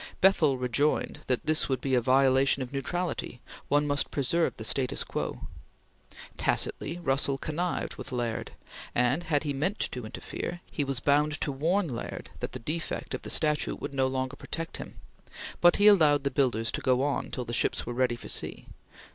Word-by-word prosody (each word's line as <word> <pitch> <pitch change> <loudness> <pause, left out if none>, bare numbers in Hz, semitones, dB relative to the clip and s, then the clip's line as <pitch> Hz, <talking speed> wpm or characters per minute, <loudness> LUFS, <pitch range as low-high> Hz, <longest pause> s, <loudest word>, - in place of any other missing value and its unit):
Bethell 160 -8 +4
rejoined 125 +4 0
that 125 - 0
this 155 -1 +1
would 130 -2 +1
be 135 +1 -2
a 125 - +4
violation 130 +1 +4
of 125 - -9
neutrality; 165 -2 -2 0.3
one 145 +1 +3
must 145 -1 0
preserve 140 0 +1
the - - -6
status 130 +3 +1
quo. - - -4 1.0
Tacitly 165 +4 0
Russell 135 -4 +1
connived 165 +5 -2
with - - -7
Laird, 120 -2 -2 0.5
and, 125 +8 +2
had 150 -3 +1
he 145 -2 -1
meant 160 +10 -1
to 125 - -3
interfere, 175 +9 -6
he 145 - -1
was 135 -2 -1
bound 145 +3 +2
to 145 - 0
warn 170 +8 +1
Laird 120 -5 -6
that - - -4
the - - -2
defect 155 +7 -4
of - - -3
the - - -8
statute 150 -1 +1
would - - -5
no 135 -1 +2
longer 130 0 -2
protect 165 +3 -6
him, - - -8 0.6
but 175 0 +6
he 205 - +3
allowed 155 -9 +6
the 140 - 0
builders 120 -4 +1
to - - -3
go 130 0 +2
on 145 0 -1
till 125 - -4
the 120 - -5
ships - - 0
were 120 - -4
ready 125 -1 +1
for - - -10
sea. - - -2
140 Hz, 185 wpm, -28 LUFS, 130-155 Hz, 1.0 s, but